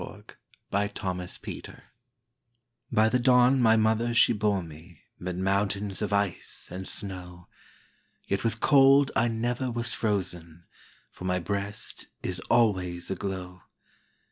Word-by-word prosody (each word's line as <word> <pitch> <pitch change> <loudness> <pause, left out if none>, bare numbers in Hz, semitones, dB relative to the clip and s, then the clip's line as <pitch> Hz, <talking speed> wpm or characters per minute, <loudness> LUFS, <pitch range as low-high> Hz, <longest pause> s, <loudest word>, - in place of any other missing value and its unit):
BrooksBY 95 -3 -4 1.3
the 125 - +3
Don 125 +1 +5
my 110 -1 +5
mother 110 +2 +2
she 120 - +5
bore 105 -3 0
meMid 85 +2 -9
mountains 100 +1 0
of 105 - -2
ice 100 -3 -1
and 95 +1 -6
snow; 90 -3 -6 0.8
Yet 100 - -1
with 115 -1 -1
cold 140 0 +5
I 115 - +3
never 120 +3 -1
was 120 -1 -2
frozen, 90 -6 -2 0.5
For 90 - -10
my 90 0 +1
breast 100 +3 -4 0.2
is 90 0 -2
always 95 -7 +1
aglow. 95 -1 -5
100 Hz, 110 wpm, -27 LUFS, 90-115 Hz, 1.3 s, Don